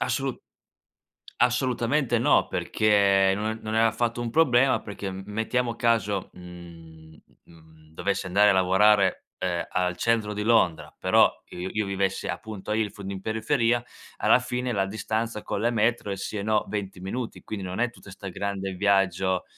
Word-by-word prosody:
Assolu 130 +1 -1 1.0
assolutamente, 125 +1 +1
no, 115 - +3
perché 100 -2 +3
no 110 +2 -2
non 110 0 -3
è - - +4
affatto 115 +1 +1
un 120 - -2
problema, 130 -2 +3
perché 105 -1 -6
m 95 0 -6
mettiamo 115 +3 -1
caso, 115 -4 0
mhmm, 85 -3 -13 0.3
uhm, 85 - -18
mhmm, 80 -1 -20
dovessi 100 +1 -2
andare, 100 +3 +4
a - - +5
lavorare, 95 +1 +3
uhm, 90 -2 -1
al 90 -1 0
centro 110 +1 0
di 105 - -3
Londra, 110 -7 +2
però - - +4 0.2
i 90 +1 -5
io 105 -2 0
vivessi 95 0 -1
appunto 105 -1 -5
a - - +1
Ilford, 100 -3 -3
in 95 - -6
periferia, 115 +3 +1 0.4
alla 125 - +4
fine 125 0 -3
la 100 -2 +1
distanza 110 +2 -3
con - - -3
le 115 +2 +2
metro, 115 -1 0
è 100 - -2
sì 100 +2 -5
e - - -3
no, 110 0 +1
20 100 -3 -5
minuti, 110 +6 -5
quindi 100 -3 -5
non 90 0 -5
è 120 +1 +2
tutta 105 - -15
'sta 95 +1 -10
grande 95 0 -3
viaggio, 95 -1 +1
105 Hz, 170 wpm, -26 LUFS, 95-115 Hz, 1.0 s, a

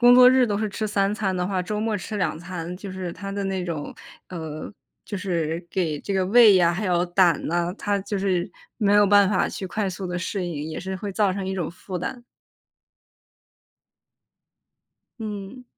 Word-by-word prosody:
工 245 0 +8
作 250 0 +9
日 260 0 +5
都 205 -3 -1
是 215 -1 -1
吃 215 +2 -4
3 200 -1 +1
餐 200 -3 -1
的 180 - 0
话， 185 -1 -1
周 210 +4 -3
末 220 -1 0
吃 210 +3 -5
2 160 -6 0
餐 175 0 -6
就 195 +1 -8
是 185 -2 -5
它 195 +3 -7
的 200 0 -3
那 190 -2 -2
种， 160 -4 -4 0.4
呃， 160 -1 -6 0.3
就 205 - -5
是 170 -3 -2
给 160 -6 -1
这 200 - -4
个 190 -1 +1
胃 215 -1 +7
呀， 175 -2 +4
还 205 +3 -2
有 175 0 +2
胆 175 -1 +3
呐， 175 +2 0
它 205 -1 0
就 200 +1 -3
是， 185 -2 0 0.3
没 205 -3 +3
有 205 0 +6
办 200 -1 +5
法 - - +2
去 - - -6
快 200 +2 -2
速 185 0 -5
地 180 0 -2
适 185 +2 -3
应， 155 -3 -4
也 155 - -5
是 190 0 -4
会 200 +2 -5
造 200 -1 +2
成 190 0 -4
一 190 - -2
种 175 -5 -2
负 185 +2 -7
担。 210 +8 -5 3.0
嗯。 210 +3 -6
190 Hz, 205 characters per minute, -24 LUFS, 175-205 Hz, 3.0 s, 作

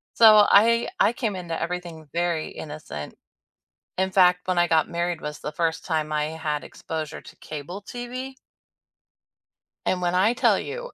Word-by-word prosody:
So, 215 -2 +8
I 230 +3 +5
I - - +5
came 220 -5 -2
into 170 -3 -4
everything 170 -2 -5
very 170 -2 -1
innocent. 150 - -8 0.8
In 190 0 0
fact, 180 -1 +4
when 185 -1 0
I 175 - +4
got 160 -2 +3
married 170 -1 -2
was 150 0 -6
the 150 - -5
first 160 +1 -1
time 155 -3 -1
I 150 0 +1
had 155 -2 -3
exposure 160 -1 -6
to - - -14
cable 155 +6 -7
TV 245 +4 -6 1.5
and 180 - 0
when 175 0 0
I 200 +6 +4
tell 245 - +3
you, - - -6
175 Hz, 160 wpm, -25 LUFS, 160-200 Hz, 1.5 s, So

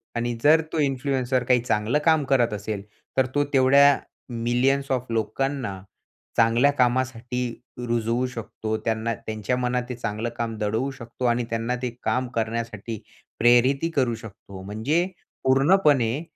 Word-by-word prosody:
आणि 120 0 -1
जर 155 +2 +6
तो 160 - 0
इन्फ्लुएन्सर 130 -2 0
काही 125 0 +3
चांगलं 110 +3 +1
काम 160 -2 +4
करत 125 -5 +2
असेल, 105 -1 -4 0.3
तर 130 - +4
तो 145 - +3
तेवढ्या 140 +2 +6 0.5
मिलियन्स 135 +3 +1
ऑफ 125 -1 0
लोकांना 115 -2 -2 0.6
चांगल्या 115 +5 +4
कामासाठी 125 -1 0 0.5
रुजवू 115 +1 0
शकतो 110 -2 -5
त्यांना 115 +1 0
त्यांच्या 110 +3 -3
मनात 125 0 0
ते 125 - -3
चांगलं 115 -1 -3
काम 115 -1 -2
दडवू 110 +5 -1
शकतो 125 -1 -7
आणि 120 0 +2
त्यांना 115 +2 -1
ते 125 - -1
काम 130 0 0
करण्यासाठी 115 -1 -3 0.4
प्रेरीतही 125 +6 +4
करू 125 -7 +1
शकतो. 100 -4 -11
म्हणजे 110 - 0 0.4
पूर्णपणे 135 -2 +3
120 Hz, 135 wpm, -24 LUFS, 115-135 Hz, 0.6 s, जर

